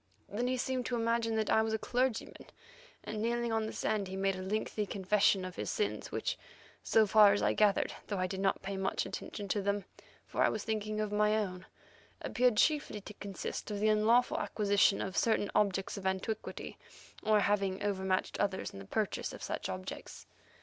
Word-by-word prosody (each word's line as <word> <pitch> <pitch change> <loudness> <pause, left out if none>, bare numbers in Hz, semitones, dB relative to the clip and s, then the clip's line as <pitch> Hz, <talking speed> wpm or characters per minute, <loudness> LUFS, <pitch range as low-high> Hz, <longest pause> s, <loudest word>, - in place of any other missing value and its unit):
Then 235 +4 -2
he 255 0 0
seemed 255 0 -1
to 245 - -1
imagine 230 -1 +1
that 220 -1 0
I 220 - +5
was 220 0 -1
a - - 0
clergyman, 245 +1 -2 0.6
and 215 0 -4
kneeling 235 0 0
on 220 -1 0
the - - -4
sand, 205 -3 -1
he 190 - -6
made 195 0 +1
a 185 - -6
lengthy 210 +2 -2
confession 195 -1 +2
of 185 -1 -8
his - - -3
sins 425 - -2
which, - - -2 0.4
so 220 -1 +4
far 210 0 +7
as 205 - 0
I - - +3
gathered, 210 -2 +3
though 205 - -2
I 185 - +1
did 190 +1 -4
not 195 0 +1
pay 195 0 -3
much 190 0 -1
attention 205 -2 -6
to 205 - +1
them, 200 -1 -1 0.4
for - - -2
I - - +5
was 215 - -3
thinking 215 -1 -2
of 215 -1 -1
my 210 +1 +3
own, 185 -4 -3 0.5
appeared 245 -3 +2
chiefly 290 -6 +2
to 210 - -10
consist 200 0 -5
of 205 -1 -3
the 215 +1 +3
unlawful 225 +4 +3
acquisition 205 -1 +2
of 190 -1 -5
certain 220 -3 +2
objects 195 -1 +1
of 190 -1 -3
antiquity, 190 +4 -3 0.4
or 215 0 +3
of 205 - +3
having 200 -1 +1
overmatched 190 -2 -1
others 195 -2 -1
in 100 - -9
the 95 - -9
purchase - - -2
of - - -9
such - - -3
objects. 95 0 -7
210 Hz, 200 wpm, -32 LUFS, 195-220 Hz, 0.6 s, far